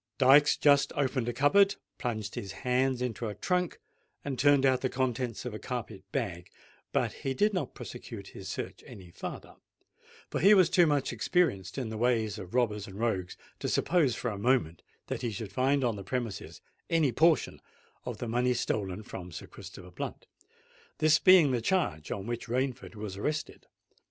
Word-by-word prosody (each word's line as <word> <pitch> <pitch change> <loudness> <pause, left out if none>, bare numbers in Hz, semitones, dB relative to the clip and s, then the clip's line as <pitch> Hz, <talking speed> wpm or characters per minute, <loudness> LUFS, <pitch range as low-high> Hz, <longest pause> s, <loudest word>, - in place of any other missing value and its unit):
Dykes 140 +2 +6
just 145 -1 +4
opened 130 -3 0
a - - -2
cupboard, 195 - +4 0.2
plunged 110 -4 -3
his 95 - -5
hands 125 0 +1
into 120 -1 -3
a 105 - -5
trunk, 180 -2 -1 0.5
and 135 -3 -3
turned 145 -1 +5
out 130 -1 +3
the 130 - 0
contents 125 -2 -2
of 125 - -4
a 105 - -6
carpet 110 -6 -6
bag: 85 -2 -3 0.4
but - - 0
he 135 -1 -4
did 210 +8 +2
not 180 - -3
prosecute - - -8
his - - -9
search - - -5
any 90 -3 -12
farther; - - -8 0.7
for - - -1
he 205 +2 +7
was 185 -3 +5
too 175 -3 +5
much 145 -3 +1
experienced 100 - 0
in 125 -4 -2
the 110 -1 -5
ways 110 -3 +1
of 95 +5 -8
robbers 105 -4 +1
and 95 -1 -10
rogues 95 -6 -1 0.2
to - - -2
suppose 160 -9 +2
for 120 - -2
a 100 - -6
moment 110 -8 +1 0.2
that - - -4
he 120 - -1
should 105 -2 -6
find 135 +4 +2
on 115 -4 0
the 100 - -7
premises 115 -1 -4 0.3
any 160 -5 +3
portion 160 +6 +2 0.4
of - - -5
the 120 - -5
money 125 +2 +1
stolen 105 -4 -2
from 90 -3 -8
Sir - - -7
Christopher 90 -1 -11
Blunt,—this 155 - -3
being 180 -7 +7
the 120 -2 0
charge 110 - 0
on 100 -1 -4
which 120 +1 -4
Rainford 125 -1 -2
was 105 -2 -6
arrested. 150 +9 -3
125 Hz, 180 wpm, -30 LUFS, 105-140 Hz, 0.7 s, he